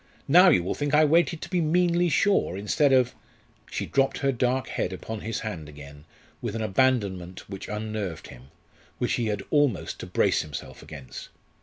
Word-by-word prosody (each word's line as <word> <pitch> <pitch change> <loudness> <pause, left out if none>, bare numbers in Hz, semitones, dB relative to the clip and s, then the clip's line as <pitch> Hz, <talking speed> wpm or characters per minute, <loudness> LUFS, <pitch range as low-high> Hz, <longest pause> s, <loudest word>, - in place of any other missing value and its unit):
Now 180 +6 +7
you 90 - +4
will 90 - -2
think 145 0 -1
I 155 +1 +6
waited 165 +1 +2
to - - -7
be 180 -2 +1
meanly 175 +2 +2
sure, 160 - +2
instead 135 +8 +2
of 130 -2 +3 0.3
" - - -30
She - - -3
dropped 135 0 +1
her 140 -1 +1
dark 130 +1 0
head - - -2
upon 110 -1 -6
his 110 -1 -4
hand 90 -9 -6
again 75 0 -12 0.4
with 115 -3 -4
an 115 - -2
abandonment 100 -6 0
which 95 -1 -8
unnerved 105 -4 -4
him, 60 +2 -13 0.5
which - - -1
he 115 - 0
had 105 -2 -2
almost 145 - +1
to - - -7
brace - - +2
himself 75 -2 -8
against. 70 -4 -10
115 Hz, 185 wpm, -26 LUFS, 95-145 Hz, 0.5 s, Now